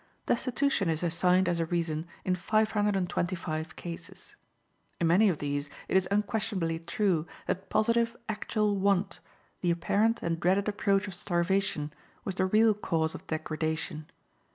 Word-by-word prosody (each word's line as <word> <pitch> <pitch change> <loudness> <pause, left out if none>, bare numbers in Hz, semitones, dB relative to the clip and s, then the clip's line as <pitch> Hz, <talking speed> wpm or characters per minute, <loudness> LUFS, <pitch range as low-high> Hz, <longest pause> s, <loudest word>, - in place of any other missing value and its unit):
Destitution 245 -5 +1
is 160 +1 -1
assigned 180 +2 +3
as 175 -1 +1
a 165 - 0
reason 165 -1 -1 0.2
in 185 - +2
five 215 +5 +1
hundred 210 -1 +1
and 185 -2 0
twenty 175 +1 -1
five 160 -2 -4
cases. 170 -1 -8 0.6
In 170 - +2
many 190 +6 +5
of 170 - 0
these 145 0 -2 0.2
it - - -1
is 190 -1 +4
unquestionably 200 -5 0
true 170 -1 0 0.2
that 190 +1 -3
positive, 230 +2 +2
actual 210 -1 0
want, 195 0 +1 0.4
the 175 - +1
apparent 205 +7 +1
and 165 -1 -1
dreaded 190 +4 +2
approach 205 -1 +1
of 195 - -6
starvation, 175 -4 0 0.3
was 195 - -2
the 185 +1 +1
real 215 +3 +5
cause 160 -6 -1
of - - -10
degradation. 155 -1 -3
185 Hz, 155 wpm, -29 LUFS, 165-205 Hz, 0.6 s, many